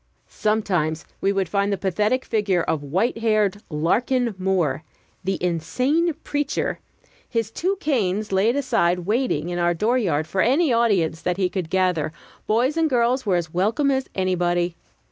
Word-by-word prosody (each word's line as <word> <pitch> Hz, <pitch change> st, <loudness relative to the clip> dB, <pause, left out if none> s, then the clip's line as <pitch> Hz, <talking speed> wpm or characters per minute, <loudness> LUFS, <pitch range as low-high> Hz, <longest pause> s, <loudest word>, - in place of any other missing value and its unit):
Sometimes 185 Hz, -8 st, 0 dB, 0.2 s
we 195 Hz, -, +2 dB
would 195 Hz, -2 st, 0 dB
find 200 Hz, +4 st, 0 dB
the 200 Hz, -, 0 dB
pathetic 210 Hz, +7 st, 0 dB
figure 200 Hz, -6 st, +1 dB
of 155 Hz, -, -1 dB
white 190 Hz, -, -1 dB
haired 215 Hz, -3 st, +1 dB
Larkin 230 Hz, -, +1 dB
Moore, 175 Hz, -7 st, 0 dB, 0.4 s
the 190 Hz, 0 st, -1 dB
insane 255 Hz, -, +1 dB
preacher, 290 Hz, -1 st, -2 dB, 0.5 s
his 225 Hz, -2 st, -1 dB
two 370 Hz, -, -1 dB
canes 215 Hz, -, 0 dB
lain 200 Hz, +6 st, +2 dB
aside, 225 Hz, -10 st, +1 dB
waiting, 200 Hz, -, 0 dB
in 175 Hz, 0 st, -2 dB
our 175 Hz, 0 st, +2 dB
dooryard 205 Hz, -7 st, +1 dB
for 190 Hz, +3 st, -1 dB
any 275 Hz, +3 st, +3 dB
audience 195 Hz, -9 st, +2 dB
that 180 Hz, 0 st, -1 dB
he 185 Hz, -2 st, +1 dB
could 180 Hz, -4 st, -4 dB
gather: 180 Hz, -5 st, +1 dB, 0.4 s
boys 250 Hz, +8 st, +2 dB
and 325 Hz, -1 st, +2 dB
girls 245 Hz, -1 st, +1 dB
were 190 Hz, -, +3 dB
as 170 Hz, -2 st, -2 dB
welcome 225 Hz, +10 st, +1 dB
as 265 Hz, -1 st, -1 dB
anybody. 175 Hz, -2 st, 0 dB
200 Hz, 155 wpm, -23 LUFS, 175-235 Hz, 0.5 s, any